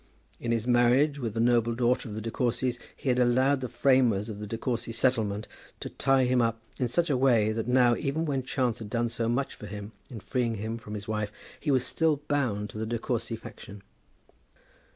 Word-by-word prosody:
In 120 - -2
his 115 -1 0
marriage 125 +4 +3
with 115 -4 -3
the - - -1
noble 120 0 +3
daughter 120 0 +1
of 105 - -6
the 110 - -4
De 115 +1 -4
Courcys 125 0 0 0.2
he 135 - -3
had 125 0 +2
allowed 130 +3 +3
the 125 - -3
framers 120 -6 +3
of 105 -2 -6
the 105 - -6
De 115 - -4
Courcy 120 -1 -2
settlement 110 -3 0 0.3
to - - -6
tie 135 -1 +2
him 125 0 +3
up 115 -1 0 0.2
in 125 - +1
such 165 +6 +1
a - - +3
way 120 -5 +3
that 110 +1 -3
now, 125 -1 +4
even 155 +4 -1
when 140 -4 0
chance 125 -2 -1
had 110 -3 -7
done 120 +1 0
so 115 0 -2
much 135 +3 -1
for 105 - -10
him 105 +1 -7 0.2
in 120 -5 -7
freeing 120 +1 -1
him 110 +2 -4
from 105 -2 -8
his 105 0 -7
wife, 105 -1 -2 0.3
he 150 - -3
was 130 -3 +3
still 160 -2 +1
bound 110 -8 0
to 110 - -7
the 110 - -2
De 120 +1 -1
Courcy 115 0 -2
faction. 100 -2 -11
120 Hz, 220 wpm, -28 LUFS, 110-130 Hz, 0.3 s, now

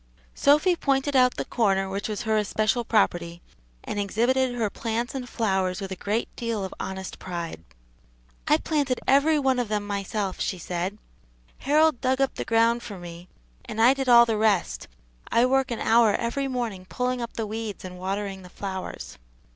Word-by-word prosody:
Sophy 300 +6 +4
pointed 275 -2 0
out 250 -1 +5
the - - -2
corner 195 -5 +1
which 195 +3 -4
was 210 - -3
her 220 -1 +1
especial 215 +3 +1
property, 175 -7 +1 0.4
and 205 - -4
exhibited 245 +5 +1
her 230 -3 0
plants 230 +3 -3
and 255 -2 -5
flowers 190 -5 0
with 195 -1 -6
a - - -3
great 210 +5 -1
deal 230 -4 -2
of 190 - -7
honest 190 0 -5
pride. 170 - -6 0.8
"I 300 - +5
planted 285 -6 -1
every 285 +4 +4
one 265 -3 +2
of 245 - -1
them 210 -1 -2
myself," 200 -1 -3
she 185 - -1
said. 180 +3 -3 0.6
"Harold 305 -1 +3
dug 260 0 +1
up 270 -1 +1
the - - -5
ground 230 +1 +3
for 205 -5 -8
me, 175 0 -10 0.4
and 220 - -6
I 240 +4 +7
did 270 -1 -2
all 235 -1 +8
the 225 -2 0
rest, 205 - +1 0.4
I 235 - +4
work 265 0 +2
an 235 - -2
hour 225 -2 +4
every 270 +4 -1
morning 230 -8 -4
pulling 250 0 -1
up 235 - -5
the 225 - -3
weeds 215 -2 -5
and 180 0 -8
watering 195 +1 -3
the 180 - -12
flowers." 190 - -6
225 Hz, 180 wpm, -25 LUFS, 195-255 Hz, 0.8 s, all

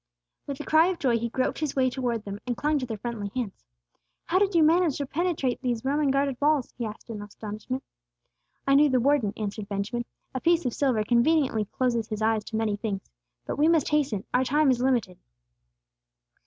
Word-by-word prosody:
With 280 -1 -5
a - - -4
cry 315 +2 +5
of 370 -1 -1
joy 240 -6 +1
he 235 +1 -2
groped 255 +2 -1
his 305 -3 -2
way 260 -1 +3
toward 245 -4 -2
them, 200 0 -6
and 245 - -1
clung 300 0 +1
to 255 - -4
their 220 -2 -4
friendly 215 -2 -4
hands. 235 -6 -4 0.6
"How 365 +3 +2
did 400 -2 +1
you 330 - +6
manage 325 -1 +3
to 285 - -2
penetrate 295 -4 -1
these 245 -2 -2
Roman 285 +1 +2
guarded 275 -1 +1
walls?" 290 -3 +2
he 235 -3 -3
asked, 215 +2 -9
in 210 -2 -6
astonishment. 215 +5 -6 0.8
"I 275 - +3
knew 290 +1 +6
the 255 -1 +3
warden," 260 -4 +2
answered 210 -1 -4
Benjamin. 205 +4 -2 0.3
"A 260 - -3
piece 340 -2 +3
of 245 - 0
silver 255 -7 +1
conveniently 240 -1 +2
closes 235 0 -1
his 215 0 -3
eyes 220 -1 +2
to 220 - -6
many 220 -2 0
things. 205 - -4 0.3
But - - -4
we 300 - +5
must 325 -3 +3
hasten! 275 -10 +1
Our 250 - +3
time 290 +2 +3
is 245 -1 0
limited." 240 -9 0
255 Hz, 205 wpm, -27 LUFS, 220-290 Hz, 0.8 s, you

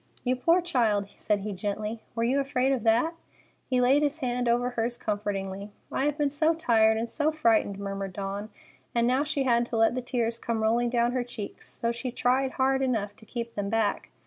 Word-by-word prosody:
"You 255 0 +1
poor 335 +8 +3
child!" 225 - +1
said 205 -1 0
he 210 +1 -4
gently. 210 +3 -3
"Were 230 - 0
you 255 +4 +2
afraid 270 -1 +1
of 260 -5 0
that?" 235 +9 +3 0.6
He 255 -1 +2
laid 260 +4 +4
his 295 +1 +1
hand 245 -4 -1
over 245 +1 +2
hers 235 0 -1
comfortingly. 200 -1 -3 0.2
"I 270 - 0
have 295 0 0
been 290 -2 +1
so 315 +3 +2
tired 220 -7 +3
and 230 +1 -1
so 300 +5 0
frightened," 230 -9 +2
murmured 195 -1 -4
Dawn; 200 +2 -4 0.5
and 235 0 +3
now 255 +3 +2
she 290 -2 -1
had 240 -2 +3
to 235 - -2
let 225 +1 +4
the 255 - -2
tears 235 -2 -1
come 230 -2 -2
rolling 235 +2 +2
down 240 0 +2
her 250 -1 0
cheeks, 230 -4 -7
though 235 - 0
she 240 +2 -4
tried 260 +2 +1
hard 265 0 +2
enough 220 -6 -1
to 220 - -16
keep 235 -1 -5
them 200 -1 -3
back. 220 -2 0
235 Hz, 210 wpm, -27 LUFS, 215-260 Hz, 0.6 s, laid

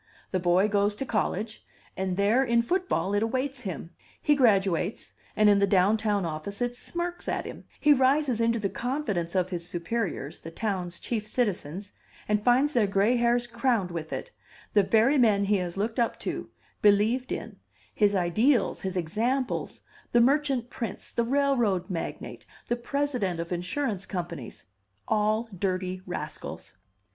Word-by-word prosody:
The 185 - +1
boy 180 +3 +3
goes 205 0 +1
to 270 - -4
college, 215 -1 -2 0.3
and 190 -1 -2
there 210 +6 +3
in 235 -2 +2
football 360 - 0
it 205 - +2
awaits 260 +4 -1
him; 180 -5 -6 0.3
he 295 - +3
graduates, 200 - +2 0.2
and 215 - +4
in 205 -1 +6
the 200 - +3
down 195 +2 +4
town 210 -3 0
office 165 +5 -4
it 245 0 -1
smirks 345 +6 -4
at - - -1
him; - - -8
he 295 -1 +6
rises 265 -2 +2
into 230 0 +2
the 210 -3 0
confidence 205 - -2
of 185 0 +1
his 175 -1 -4
superiors, 175 -5 -3
the 165 - -8
town's 185 -2 -3
chief 215 -3 -3
citizens, 200 - -2 0.4
and 210 0 +2
finds 260 +5 +4
their 230 -6 +3
gray 200 +5 +2
hairs 240 0 +2
crowned 235 -5 0
with 160 -2 -5
it, - - -5 0.4
the 205 - +6
very 225 +8 +3
men 210 -4 +4
he 205 +1 +3
has 180 -1 -3
looked 220 +4 -1
up 235 - 0
to, - - -4 0.3
believed 215 +5 +3
in, - - -5 0.4
his 205 -2 +3
ideals, 215 +9 +2
his 190 -1 -3
examples, 230 +10 -1 0.3
the 240 - +6
merchant 270 -1 +2
prince, 230 - -5
the 235 - 0
railroad 240 -8 +1
magnate, 170 - -5 0.2
the 240 - +2
president 245 -8 -1
of 170 +1 -4
insurance 190 +4 -2
companies 170 - -6 0.4
all 215 +1 +1
dirty 185 0 -2
rascals! 180 - -6
210 Hz, 160 wpm, -27 LUFS, 185-245 Hz, 0.4 s, in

